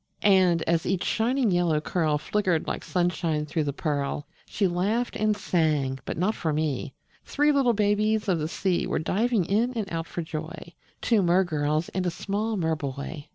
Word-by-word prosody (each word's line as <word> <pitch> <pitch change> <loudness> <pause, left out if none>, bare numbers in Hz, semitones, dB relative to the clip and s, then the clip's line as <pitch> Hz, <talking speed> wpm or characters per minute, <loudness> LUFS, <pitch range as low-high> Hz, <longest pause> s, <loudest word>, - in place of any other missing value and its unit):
And, 185 -5 +4
as 165 0 0
each 190 -1 0
shining 240 0 +1
yellow 175 -3 +2
curl 155 -1 0
Flickered 180 0 0
like - - -4
sunshine 175 -4 0
through 155 +1 -1
the 140 - -1
pearl, 145 -1 -2 0.2
She 200 - 0
laughed 200 +8 -1
and 215 -1 +1
sang 150 -8 0
but - - -4
not 185 +6 +1
for 160 -6 -2
me: 150 -3 -2 0.3
Three 295 +1 +2
little 270 -4 +3
babies 210 +1 +1
of 180 -4 +2
the 155 - -1
sea 180 +1 -1
Were - - -1
diving 210 +4 +1
in 225 +7 +1
and 225 -4 -2
out 165 0 -3
for 170 - -4
joy 160 +2 -7 0.3
Two 225 -4 +3
mer 180 +1 +4
girls 155 -1 -1
and 185 -1 -2
a - - +3
small 210 +5 -2
mer 160 -3 0
boy. 145 +1 -6
175 Hz, 185 wpm, -26 LUFS, 155-210 Hz, 0.3 s, And